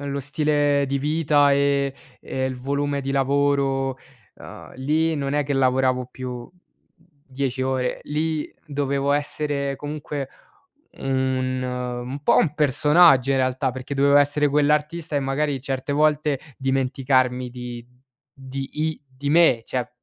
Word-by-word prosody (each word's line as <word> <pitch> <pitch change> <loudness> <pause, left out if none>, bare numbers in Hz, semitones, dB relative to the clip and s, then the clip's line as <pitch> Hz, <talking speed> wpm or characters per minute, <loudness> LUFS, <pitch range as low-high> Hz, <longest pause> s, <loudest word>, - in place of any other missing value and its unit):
Lo 140 0 -3
stile 145 0 +1
di 140 +1 -1
vita 145 -1 +3
e 140 -1 +1 0.3
e 130 0 -3
il 130 -1 -2
volume 140 +2 -2
di 135 0 -4
lavoro, 135 -1 +1 0.4
ehm, - - -12
lì 155 +4 +1
non 140 0 -2
è 145 -1 +1
che 140 0 -2
lavoravo 130 -1 +2
più 125 -2 -7 0.8
10 130 -1 -2
ore, 130 -1 -1
lì 155 0 -2 0.2
dovevo 140 -1 0
essere 145 -1 -1
comunque, 145 -2 -5 0.6
mhmm, 130 -1 -1 0.5
un 140 +1 -5
po' - - +4
un 150 -3 +2
personaggio 150 -1 +4
in - - +2
realtà, 130 +1 0
perché 130 +2 -8
dovevo 140 +1 +4
essere 145 +1 +3
quell'artista 150 +3 0
e - - +2
magari 135 0 -1
certe 135 +1 -3
volte 150 -1 +2 0.2
dimenticarmi 130 -1 +1
di 120 -1 -8 0.5
di 135 0 -7 0.2
i 155 -2 -3
di 135 +2 -5
me, 155 -8 +5
cioè 125 -1 -3
140 Hz, 135 wpm, -23 LUFS, 130-145 Hz, 0.8 s, me